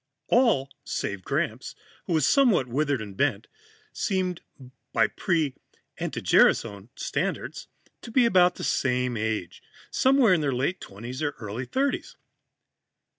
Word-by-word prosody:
All 220 - +3
save 100 -2 -4
Gramps, - - -2 0.3
who 175 - 0
was 155 -4 +3
somewhat 245 - +4
withered 140 -1 -1
and 100 -2 -10
bent, - - 0 0.5
seemed, 185 -3 -1 0.5
by - - +4
pre 160 -7 0 0.5
anti - - -3
gerasone 100 +2 +3
standards, - - -3 0.3
to - - -9
be 245 +1 +4
about 180 -5 +4
the - - -7
same 125 -1 0
age 110 -5 -3 0.3
somewhere 260 -6 +4
in 170 - +2
their 140 -2 0
late 140 +9 -1
twenties 120 +7 -8
or 145 -2 -1
early 110 +4 -5
thirties. 270 - -1
145 Hz, 130 wpm, -26 LUFS, 120-185 Hz, 0.5 s, somewhat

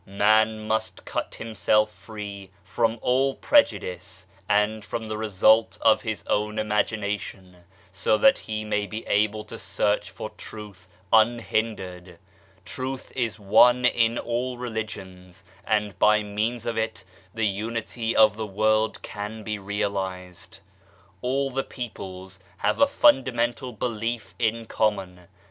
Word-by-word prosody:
Man 110 +2 +3
must 110 0 -2
cut - - -4
himself 110 -1 +1
free 105 -3 -8
from 115 +4 0
all 135 +2 +2
prejudice 95 - +1 0.2
and 105 +1 +2
from 110 +2 -5
the 110 0 -4
result 110 +1 +3
of 110 -1 +4
his 110 -2 -4
own 105 +1 -1
imagination, 105 -3 -2 0.3
so 100 +3 +1
that 180 +10 +5
he 110 0 -4
may 105 -1 -1
be 110 +2 -6
able 105 +1 +1
to - - -9
search 105 -3 0
for 95 +3 -7
Truth 100 -4 -10 0.3
unhindered. 110 -6 +1 0.5
Truth 130 +6 -5
is 120 -4 -1
one 120 +5 +5
in 115 -1 +3
all 125 +1 -2
religions, 95 -6 -7 0.2
and 105 -3 0
by 105 0 +5
means 110 +3 -2
of 115 -1 -1
it 110 -2 -3 0.3
the 110 0 0
unity 115 +3 -2
of 110 -2 +6
the 110 -1 -3
world 110 +2 +1
can 105 +1 -6
be 105 0 -3
realized. 95 -2 -4 0.6
All 135 +2 0
the 135 +1 -1
peoples 95 -6 -8 0.2
have - - 0
a 285 - +7
fundamental 130 - +2
belief 115 -1 -3
in 115 -1 0
common. 95 -6 -1
110 Hz, 130 wpm, -25 LUFS, 100-115 Hz, 0.6 s, a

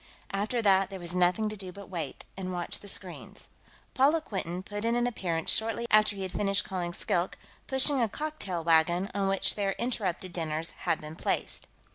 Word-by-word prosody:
After 210 +4 0
that, 195 -2 +5
there 195 - -6
was 175 0 -2
nothing 180 +4 +3
to 215 - -5
do 190 -3 -6
but 200 +1 -10
wait, 165 -7 -5
and 185 -1 -4
watch 175 -1 -3
the 205 - -11
screens. 185 -3 -5 0.4
Paula 285 +5 +4
Quinton 185 - -4
put 205 +1 -5
in 230 +1 +2
an 240 0 +2
appearance 175 -9 0
shortly 225 +1 +2
after 215 -1 +5
he 195 - -4
had 185 - -3
finished 200 0 +1
calling 180 -2 -2
Skilk, 175 +1 -1 0.3
pushing 265 0 +4
a 230 - +2
cocktail 205 - -3
wagon 170 +4 +3
on 200 -1 +1
which 195 0 +2
their 200 -2 0
interrupted 190 -7 -2
dinners 160 -1 -2
had - - -1
been 155 +1 -8
placed. - - -2
195 Hz, 190 wpm, -29 LUFS, 175-215 Hz, 0.4 s, that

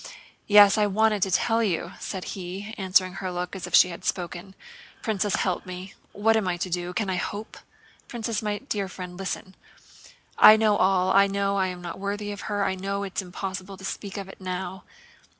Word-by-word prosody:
"Yes, 205 0 +7
I 210 - +4
wanted 210 +1 +2
to 190 - +2
tell 225 +5 +2
you," 175 -5 -1
said 190 -2 -5
he, 195 +3 -6
answering 185 -1 +2
her 185 -1 -3
look 180 +1 -4
as 185 -2 -5
if 175 - +1
she 180 - +7
had 170 - -8
spoken. 180 +1 -4 0.5
"Princess, 210 -3 0
help 185 -2 -1
me! 185 +1 -8 0.2
What 225 +2 +2
am 215 -4 +1
I 175 -1 0
to 180 +1 -4
do? 175 0 -2
Can 205 +3 -2
I 185 -1 -1
hope? 205 +4 -5 0.5
Princess, 230 -2 -3
my 210 -1 -1
dear 205 -6 -3
friend, 180 -1 -8
listen! 190 0 -5 0.9
I 215 - +10
know 215 -1 +3
it - - 0
all. 185 0 +3
I 200 +1 +6
know 200 0 0
I 190 -1 +2
am 180 -1 -6
not 175 +1 -6
worthy 205 +1 -3
of 205 +1 -7
her, 205 -1 0
I 190 - 0
know 195 +1 -3
it's 195 0 -3
impossible 190 +1 -6
to 190 - -9
speak 200 +1 -5
of 195 -1 -5
it 195 - -13
now. 185 0 -5
195 Hz, 205 wpm, -26 LUFS, 185-205 Hz, 0.9 s, I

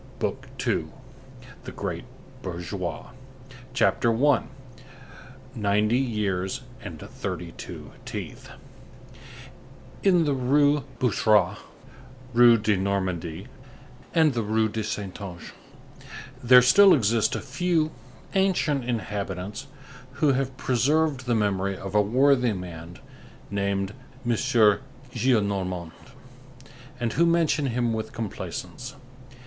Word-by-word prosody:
BOOK - - -3
SECOND—THE - - -6
GREAT - - -4 0.4
BOURGEOIS 90 +4 -5 0.6
CHAPTER 120 -2 +3 0.2
I—NINETY 125 -4 -2
YEARS 100 -7 -1 0.2
AND 90 -8 -7
THIRTY - - -6
TWO - - -9
TEETH - - -7 1.5
In 180 -4 +4
the 145 - +1
Rue 145 +2 +3
Boucherat, 105 -5 +2 0.7
Rue 120 0 +7
de 110 -1 +1
Normandie 95 -3 -2 0.7
and 160 -4 +4
the 120 - -1
Rue 110 +1 +1
de 110 +1 -3
Saintonge 100 -4 -6 0.9
there 125 0 +8
still 195 +10 +7
exist 115 -3 +2
a - - -2
few 155 +3 0 0.4
ancient 175 -8 +1
inhabitants 100 -5 -4 0.5
who 140 +1 +2
have 130 -1 -2
preserved 140 +1 +1
the 120 - +2
memory 100 -2 0
of 95 0 -7
a 105 - +5
worthy 125 +2 +3
man 85 -2 -8 0.5
named 100 0 -1 0.3
M. 120 - +1
Gillenormand, 105 - +1 1.1
and 120 -2 -1
who 170 +4 +3
mention 165 -4 +2
him 120 -1 0
with 110 0 -4
complaisance. 115 -4 -6
115 Hz, 100 wpm, -25 LUFS, 100-135 Hz, 1.5 s, there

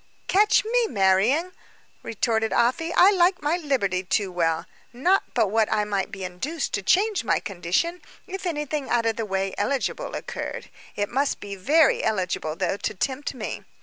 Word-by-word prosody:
"Catch 415 +2 +4
me 475 +1 +2
marrying," 215 - +2 0.5
retorted 225 0 -1
Afy; 325 +8 +1
"I 380 +3 +7
like 365 -3 +2
my 300 +3 +2
liberty 250 - 0
too 190 +1 -1
well. 165 -1 0 0.3
Not 350 +11 +2
but 225 -5 +2
what 220 0 +2
I 210 - +2
might 205 -1 -2
be 195 -3 -7
induced 225 - -4
to - - 0
change 410 - +2
my - - +1
condition, 200 - -2 0.2
if 380 0 -5
anything 295 -3 -3
out 235 -1 +1
of 225 -1 +1
the 225 -2 -3
way 195 0 -1
eligible 260 +6 -2
occurred; - - -6 0.2
it 205 0 -1
must 275 +3 0
be 200 -1 -7
very 290 - +3
eligible, 180 -7 -1
though, 185 +2 -1
to 210 - -3
tempt 270 +7 -3
me. 220 -4 -5
230 Hz, 170 wpm, -24 LUFS, 195-325 Hz, 0.5 s, I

